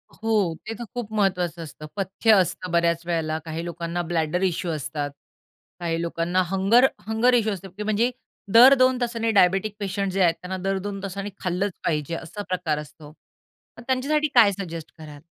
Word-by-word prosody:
हो, 210 -7 0
ते 225 - -3
तर - - -4
खूप 235 -3 -5
महत्वाचं 180 -5 0
असतं. 155 0 -10
पथ्य 195 +3 +1
असतं 180 0 -4
बऱ्याच 170 0 +1
वेळेला, 160 -2 -1
काही 165 +1 -5
लोकांना 170 0 -3
ब्लॅडर 165 +2 0
इश्यू 175 -1 0
असतात, 145 -1 -3 0.7
काही 165 -1 -2
लोकांना 170 +2 0
हंगर 210 +7 +5 0.2
हंगर 230 +3 +3
इश्यू 220 -3 +2
असतात 195 +1 -9
म्हणजे 215 +4 +1 0.4
दर 250 +4 +9
2 255 0 +4
तासांनी 230 -1 0
डायबिटिक 195 +1 +3
पेशंट 195 -1 -2
जे 195 0 0
आहेत 170 -1 +3
त्यांना 185 +1 -4
दर 195 - +1
2 195 -1 -5
तासांनी 200 +1 -4
खाल्लंच 185 +2 -1
पाहिजे 155 0 -1
असा 170 +6 -7
प्रकार 175 -5 -1
असतो. 150 0 -11 0.7
मग - - -10
त्यांच्यासाठी 295 +4 +1
काय 215 -4 +7
सजेस्ट 170 -5 -7
कराल? 150 -2 -11
185 Hz, 170 wpm, -24 LUFS, 165-215 Hz, 0.7 s, दर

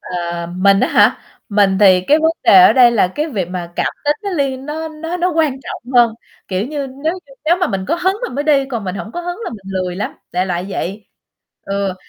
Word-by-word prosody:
Ờ, 170 -1 -4
mình 195 +1 +4
á - - +2
hả? - - +4 0.3
Mình 200 -2 +3
thì 190 -3 +6
cái 300 - +5
vấn 320 +1 +3
đề 360 +1 +8
ở 370 - +7
đây 250 -2 +6
là 210 -6 +2
cái 300 - -1
việc 200 - -3
mà 175 -2 -6
cảm - - 0 0.2
tính 295 - +3
nó 400 - -3
liên 275 -6 -2
nó 320 +2 -4
nó 325 +3 -5
nó 360 +1 0
quan 315 -5 +1
trọng 250 -1 -8
hơn, 240 -3 +4 0.3
kiểu 190 +3 -1
như, 285 0 -4
nếu 280 +5 -3
như 275 - -17
nếu 335 +3 +3
mà 360 0 0
mình 195 -8 -3
có - - +2
hứng 370 +3 0
mình 370 - -4
mới 285 +2 -2
đi, 285 -3 +3
còn 230 -5 -3
mình 185 -1 -3
hổng 210 +2 -7
có 350 - -4
hứng 350 +2 -5
là - - -4
mình 200 -4 -11
lười 185 -1 -2
lắm, 200 - -3 0.2
đại 180 +1 0
loại 180 0 -3
vậy. 200 +2 -5 0.6
Ừ, 195 -1 -2
245 Hz, 250 wpm, -17 LUFS, 190-310 Hz, 0.6 s, đề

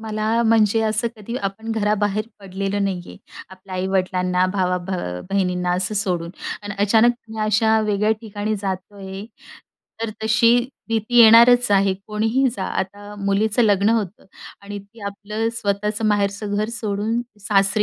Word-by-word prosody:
मला 220 +1 0
म्हणजे 225 -1 +3
असं 220 +2 0
कधी 230 +4 -6
आपण 200 +1 -4
घराबाहेर 210 0 0
पडलेलं 195 +1 -3
नाही 190 -2 -2
आहे. - - -11 0.3
आपल्या 190 0 -11
आई-वडिलांना 185 -1 0
भावा 180 -2 +1
भ - - -5 0.4
बहिणींना 180 -2 0
असं 185 +4 -1
सोडून 180 -5 -1 0.3
अन् 205 0 -5
अचानक 225 +3 +4 0.2
मी 220 0 -8
अशा 220 +1 +3
वेगळ्या 210 0 +1
ठिकाणी 215 -1 -3
जातोय, 195 +1 -5 0.8
तर 225 - -2
तशी 230 +2 +4 0.3
भीती 225 +2 -1
येणारच 235 +1 +7
आहे 195 -1 +3
कोणीही 225 +5 +1
जा. 190 - -3
आता 205 +2 -5
मुलीचं 210 +4 +2
लग्न 205 -1 +3
होतं 215 -4 -2 0.4
आणि 205 0 -7
ती 200 +3 -16
आपलं 210 +3 -3
स्वतःचं 210 0 -2
माहेरचं 205 0 0
घर 215 +1 0
सोडून 220 0 -2 0.2
सासरी 200 +1 +2
205 Hz, 140 wpm, -21 LUFS, 195-220 Hz, 0.8 s, येणारच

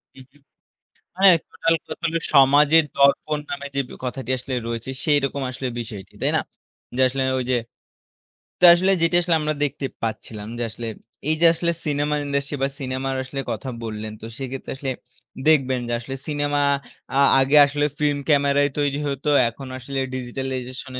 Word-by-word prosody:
উহু। 135 +2 -16 0.8
হ্যাঁ, 190 -2 +8
টোটাল 165 0 +1
কথা - - -8
হল 165 - -2 0.2
সমাজের 145 +4 +6
দর্পণ 140 +2 +3
নামে 140 0 -4
যে 140 - +1
ব্যা - - -10
কথাটি 130 0 -4
আসলে 130 +1 -5
রয়েছে, 115 +2 -4
সেইরকম 140 -2 +1
আসলে 130 +1 -5
বিষয়টি 105 -5 -8
তাই - - +2
না? - - +3 0.6
যে - - 0
আসলে 135 +1 -2 0.2
ওই 125 - -2
যে 125 - +3 1.0
তো - - +3
আসলে 185 +2 +2
যেটি 165 +1 +3
আসলে 170 -1 +1
আমরা 150 0 -1
দেখতে 140 -1 -3 0.2
পাচ্ছিলাম 110 -1 -5
যে - - -2
আসলে 115 +1 -7 0.4
এই 155 - +3
যে 170 - +6
আসলে 170 +1 0 0.2
সিনেমা 145 0 0
ইন্ডাস্ট্রি 140 0 -2
বা 135 - +2
সিনেমার 130 0 -2
আসলে 135 +1 -5
কথা 135 - -4
বললেন 110 -1 -5
তো 115 - -8
সেক্ষেত্রে 135 0 -6
আসলে 135 -1 -3 0.6
দেখবেন 130 -5 +3
যে - - -2
আসলে 135 +3 -6
সিনেমা 145 -1 0 0.6
আ - - +5 0.2
আগে 135 +3 +3
আসলে 145 +1 -1
ফিল্ম 145 -1 +1
ক্যামেরাই 145 -1 +3
তৈরি 145 0 0
হত। 140 0 -4 0.2
এখন 130 +3 -9
আসলে 135 +2 -5 0.2
digitalization 130 0 -5
140 Hz, 165 wpm, -23 LUFS, 130-145 Hz, 1.0 s, হ্যাঁ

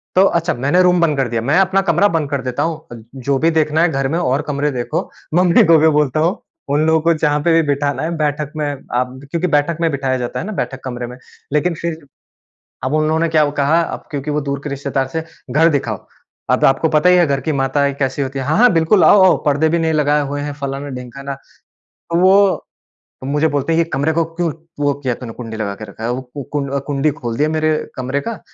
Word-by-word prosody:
तो 185 - +6
अच्छा 170 -2 +1
मैंने 140 +8 +2
रूम 180 -1 +3
बंद 155 -4 +2
कर 135 -2 +1
दिया, 115 0 -1
मैं 140 +7 +1
अपना 195 0 +3
कमरा 205 - +4
बंद 150 -3 -2
कर 140 -2 -1
देता 125 -1 -2
हूँ, 155 -8 -5
जो 135 +1 -1
भी 165 +3 +3
देखना 155 0 +1
है 175 - +4
घर 135 -1 0
में 160 +5 -1
और 135 -3 +1
कमरे 145 0 -1
देखो 120 -2 -3 0.2
मम्मी 175 0 +5
को 165 -1 +6
भी 160 - +4
बोलता 150 -2 +2
हूँ 170 +7 +1 0.3
उन 150 +2 +2
लोगों 160 0 +3
को 170 +1 +3
जहाँ 150 -2 +1
पे 170 - +3
भी 165 - +5
बिठाना 145 +1 0
है 165 +1 -2
बैठक 150 -1 -1
में 155 -1 -2 0.3
आप 125 +1 -2
क्योंकि 170 +1 0
बैठक 150 +1 +1
में 165 - +2
बिठाया 135 -2 -1
जाता 120 -1 -4
है - - -4
ना 215 - -5
बैठक 135 -7 -3
कमरे 125 -2 -5
में 125 +1 -10 0.4
लेकिन 170 +4 +1
फ़िर 170 -1 -2 0.9
अब 130 - -1
उन्होंने 155 +2 +1
क्या 160 -1 +3
अब 145 - 0
कहा, 150 +4 +3
अब 165 - -5
क्योंकि 145 0 -3
वो 150 0 0
दूर 140 -1 -3
के 150 - -4
रिश्तेदार 135 -1 -2
थे, 160 - 0 0.3
घर 165 +3 +5
दिखाओ। 145 -4 -1 0.5
अ - - +4
आपको 135 +4 +2
पता 155 +3 +3
ही 180 - +6
है 175 - +5
घर 140 -1 0
की 155 - -1
माताएँ 140 +1 +1
कैसी 135 0 -1
होती 135 0 -3
है? 135 - -3
हाँ, 150 +3 +1
हाँ 245 +2 +6
बिल्कुल 165 +4 +3
आओ-आओ, 190 -2 +6
परदे 145 +2 +2
भी 170 +1 +1
नहीं 160 -1 0
लगाए 150 -1 +2
हुए 145 +1 -3
हैं, 145 0 -4
फ़लाना 140 0 -5
ढिमकाना, 130 +2 -7 0.6
तो 170 - -5
वो 195 +1 +4 0.6
मुझे 145 +4 +1
बोलते 145 +1 -1
हैं 170 - +3
कि - - -18
कमरे 145 +3 0
को 165 0 +1
क्यों 170 -1 0 0.3
वो 145 -1 +2
किया 130 -2 0
तूने 115 -2 -7
कुंडी 115 -2 -7
लगा 105 -2 -3
के 110 - -8
रखा 105 +2 -11
है, 120 - -1
वो 125 +2 -3 0.3
कुं 140 -1 -1
कुंडी 145 +1 +1
खोल 120 -5 -4
दिया 150 +3 +2
मेरे 155 0 +1 0.2
कमरे 130 +2 -2
का। 230 -2 -4
150 Hz, 240 wpm, -18 LUFS, 135-165 Hz, 0.9 s, तो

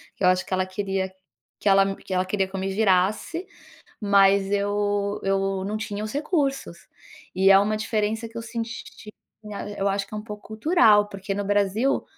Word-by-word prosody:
que - - -7
eu 180 - +6
acho 185 0 +2
que - - -5
ela 185 0 0
queria 190 0 -3 0.5
que 205 - +1
ela 195 0 +4
que 190 - -8
ela 185 - +1
queria 195 0 0
que 190 - -10
eu - - -2
me 190 - -2
virasse, 210 - +1 0.6
mas 200 -1 +4
eu 205 0 0
eu 195 0 0
não 210 +2 -2
tinha 210 0 -4
os 215 - -5
recursos, 280 - -1 0.6
e 190 +1 +4
é 195 - +9
uma 210 +2 +1
diferença 220 +1 -1
que 230 - -8
eu 230 - -5
senti, 230 -2 -7 0.3
né, 205 0 -6
eu 195 - +1
acho 195 0 -1
que - - -25
é - - -3
um - - -6
pouco 210 -1 -10
cultural, 220 - +4
porque 195 0 -5
no 205 - -2
Brasil 205 +5 +1
205 Hz, 195 wpm, -24 LUFS, 195-215 Hz, 0.6 s, é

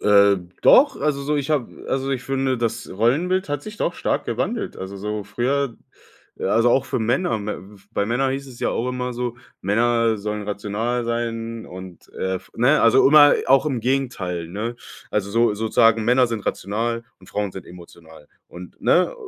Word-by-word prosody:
Äh, 100 -1 +5 0.3
doch, 285 +1 +6
also, 140 -1 0
so 150 +1 0
ich 140 +1 -2
habe 140 -6 -2
also, 135 +1 -1
ich 130 -2 -2
finde, 135 -2 -1
das 115 -2 -2
Rollenbild 150 - +1
hat 145 0 -2
sich 210 0 -9
doch - - -1
stark - - -1
gewandelt. - - -3
Also, 95 +1 -7
so 105 +1 -4
früher 125 +5 -1 0.6
äh, - - -5
also, 115 +1 +3
auch 135 +2 +3
für - - -2
Männer. 120 +3 0
Mä 105 0 -4 0.3
bei 100 - 0
Männer 130 +3 +1
hieß 135 +1 -4
es 120 - -12
ja - - +1
auch 120 - -1
immer 125 0 -3
so: 120 0 -4 0.2
„Männer 115 +2 +2
sollen 105 +1 -4
rational 105 +4 -2
sein“ 115 -1 -3
und, 90 -1 -11
äh, 95 0 -2
f 95 - -13
ne, 135 +6 +4
also, 115 +4 +6
immer 145 -1 +8
auch 135 +2 +5
im 130 -5 0
Gegenteil, 110 -10 -2
ne? 110 +6 -4 0.4
Also, 100 -1 -1
so 115 -1 +2
sozusagen 110 +1 +3
Männer 125 +2 +4
sind 115 -3 -4
rational 115 +3 -2 0.2
und 95 - -17
Frauen 105 -2 -2
sind 95 - -9
emotional. 85 -3 -14 0.2
Und 90 0 -12
ne 180 - +3
115 Hz, 185 wpm, -22 LUFS, 105-130 Hz, 0.6 s, immer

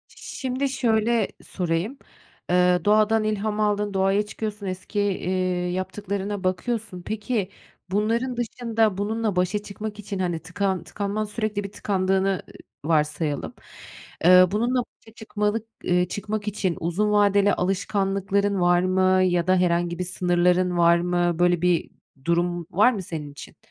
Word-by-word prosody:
Şimdi 265 +1 -3
şöyle 230 -4 +1 0.2
sorayım, 180 +8 -2 0.5
eee, 180 0 +4
doğadan 215 +1 +4
ilham 215 0 -1
aldın, 210 -1 0
doğaya 195 +2 +2
çıkıyorsun, 210 -1 -5
eski, 185 +2 -4
iii, 185 -2 -1
yaptıklarına 200 +1 -4
bakıyorsun. 190 +1 -2
Peki, 215 0 -2 0.4
bunların 230 +5 0
dışında, 225 -4 0
bununla 215 0 -1
başa 185 +3 +1
çıkmak 210 +1 -7
için, 200 -1 -5
hani, 175 -3 -1
tıkan 180 +1 -2
tıkanman 205 +4 -3
sürekli 210 -1 -3
bir 200 - -7
tıkandığını, 190 -1 0
ııı, 185 -5 -1 0.5
varsayalım. 150 -1 0 0.7
Eee, 185 0 +8
bununla 240 +4 +1
başa 220 - -21
çıkmalık 215 0 -2 0.2
eee, 180 0 +2
çıkmak 210 +2 -4
için 195 -4 -1
uzun 180 +6 0
vadeli 205 -1 +4
alışkanlıkların 195 +1 0
var 175 0 +4
mı 185 0 +3
ya 175 -1 +1
da 185 - +4
herhangi 175 -1 +1
bir 180 - 0
sınırların 180 0 +1
var 170 0 +5
mı? 175 -1 0
Böyle 175 -1 +3
bir 180 -2 +1 0.3
durum 175 0 0
var 215 +7 +4
mı 200 - -4
senin 155 -5 -6
için? 145 - -12
195 Hz, 135 wpm, -24 LUFS, 180-210 Hz, 0.7 s, Eee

